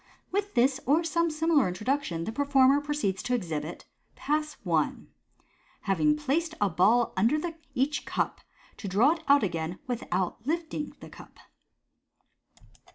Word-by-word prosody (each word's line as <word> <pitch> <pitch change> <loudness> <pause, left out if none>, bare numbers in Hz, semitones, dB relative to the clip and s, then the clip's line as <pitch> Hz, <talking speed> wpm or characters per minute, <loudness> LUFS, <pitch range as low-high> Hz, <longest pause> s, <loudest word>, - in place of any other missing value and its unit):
With 405 -1 -2
this 260 +2 +3
or 310 +5 +4
some 335 +1 +1
similar 310 - +2
introduction, 185 -2 -2
the 220 - -3
performer 275 +1 +4
proceeds 290 -10 -1
to 250 - 0
exhibit 165 -7 -4 0.3
Pass 305 +1 -2
I. - - +2 0.9
Having 300 +10 +2
Placed 315 +3 -1
a 205 - +2
Ball 215 +8 +3
under 230 +10 +3 0.4
each 275 +4 0
Cur, - - -1 0.5
to 205 - -6
draw 215 +10 +4
it 325 -1 -4
out 280 -3 +5
again 170 -2 -2
without 215 -5 -2
Lifting 315 -2 -3
the - - -10
Cup. - - -14
270 Hz, 135 wpm, -28 LUFS, 195-300 Hz, 0.9 s, out